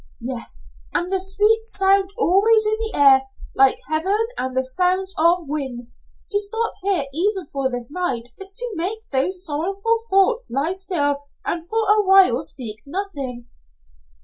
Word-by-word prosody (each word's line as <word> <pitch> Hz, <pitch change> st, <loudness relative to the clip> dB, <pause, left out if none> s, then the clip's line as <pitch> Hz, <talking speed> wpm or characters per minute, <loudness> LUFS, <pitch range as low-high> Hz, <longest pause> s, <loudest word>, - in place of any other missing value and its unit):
Yes, 240 Hz, 0 st, -6 dB, 0.3 s
and 360 Hz, +2 st, -1 dB
the 385 Hz, -, +3 dB
sweet 415 Hz, +4 st, +3 dB
sound 390 Hz, -3 st, +2 dB
always 435 Hz, +2 st, +4 dB
in 425 Hz, -, +1 dB
the 450 Hz, 0 st, -2 dB
air 270 Hz, -2 st, +5 dB, 0.3 s
like 270 Hz, -1 st, +4 dB
heaven 380 Hz, +9 st, +1 dB
and 260 Hz, -, -3 dB
the 260 Hz, -, +2 dB
sound 365 Hz, +7 st, 0 dB
of 335 Hz, 0 st, +2 dB
wings 255 Hz, -5 st, -5 dB, 0.4 s
to 410 Hz, -, +2 dB
stop 450 Hz, +3 st, 0 dB
here 380 Hz, -7 st, +1 dB
even 380 Hz, +3 st, 0 dB
for 275 Hz, -1 st, -2 dB
this 245 Hz, 0 st, -6 dB
night 265 Hz, -9 st, -2 dB
is 390 Hz, 0 st, -9 dB
to 480 Hz, +5 st, -2 dB
make 405 Hz, +6 st, -3 dB
those 360 Hz, +8 st, 0 dB
sorrowful 390 Hz, +9 st, -1 dB
thoughts 440 Hz, +6 st, +2 dB
lie 280 Hz, +8 st, -1 dB
still 320 Hz, -7 st, 0 dB, 0.3 s
and 340 Hz, -, -2 dB
for 450 Hz, 0 st, 0 dB
a 425 Hz, 0 st, +4 dB
while 380 Hz, -, +5 dB
speak 230 Hz, -8 st, -5 dB
nothing." 280 Hz, -9 st, -5 dB
365 Hz, 155 wpm, -21 LUFS, 275-400 Hz, 0.4 s, air